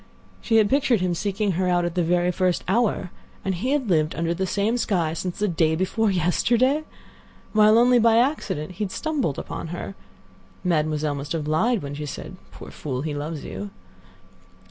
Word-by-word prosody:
She 225 - 0
had 215 -2 +5
pictured 265 -2 +2
him 180 -1 0
seeking 200 +3 -1
her 180 +1 0
at 175 -1 +1
the 180 - +1
very 175 +1 +2
first 180 0 0
hour, 195 -3 +1 0.3
and 190 - 0
he 200 +9 -2
had 280 -4 0
lived 155 -4 +1
under 165 0 0
the 190 +2 -2
same 205 +5 0
sky 170 -8 0
since 175 +2 -4
day 165 -6 +1
before 205 +5 0
yesterday; 240 - +2 0.7
while 215 0 +6
only 245 +1 +5
by 230 0 +4
accident 235 - 0
had 180 - -14
he 210 - 0
stumbled 275 - -2
upon - - -5
her. 175 +4 -6 0.7
Mademoiselle 155 -3 0
must 140 +2 -5
have 155 -3 -3
lied 210 +7 +1
when 140 0 -5
she 150 +1 -5
said, - - -7
"Poor - - -11
fool, 130 -3 -4
he 155 -1 -3
loves 150 +1 -5
you." 100 +2 -6
180 Hz, 180 wpm, -24 LUFS, 160-220 Hz, 0.7 s, while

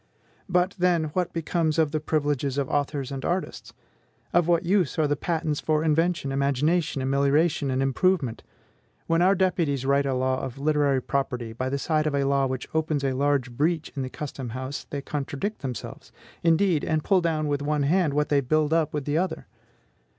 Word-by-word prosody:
But, 180 +1 +2
then, 170 -4 +2
what 180 -2 0
becomes 165 -1 -1
of 155 -3 +2
the 155 - 0
privileges 145 -3 -1
of 140 -2 0
authors 145 -1 -1
and 135 -1 -5
artists? 180 +2 -3 0.6
Of 175 -1 +3
what 170 -1 +2
use 180 -4 +1
are 155 - +3
the 145 - +1
patents 160 -1 -1
for 155 0 0
invention, 160 -2 +1
imagination, 140 +2 +1
amelioration, 140 +2 +2
and 130 +1 0
improvement? 135 -2 +1 0.6
When 165 +1 +2
our 190 +2 +5
deputies 170 -8 0
write 140 +1 +2
a 135 - 0
law 130 0 0
of 130 0 -6
literary 145 -2 +1
property 125 -4 -2
by 130 +3 -3
the 140 - -1
side 155 +2 0
of 145 - 0
a 140 - +1
law 140 0 +2
which 130 -1 -4
opens 155 -2 0
a 135 -1 +1
large 135 -2 +1
breach 155 +6 0
in 140 - -2
the 130 - -3
custom 135 -3 -6
house 130 +2 -5
they 140 -1 -4
contradict 145 +9 -4
themselves, 130 -4 -7 0.3
indeed, 165 -1 +3
and 155 -1 0
pull 190 -3 +3
down 155 -3 0
with 145 -1 -1
one 150 0 0
hand 155 0 +2
what 150 0 +1
they 145 -1 +3
build 155 +3 +1
up 155 -2 +1
with 145 -2 -3
the 150 +2 +1
other. 185 +1 -2
150 Hz, 190 wpm, -25 LUFS, 140-165 Hz, 0.6 s, our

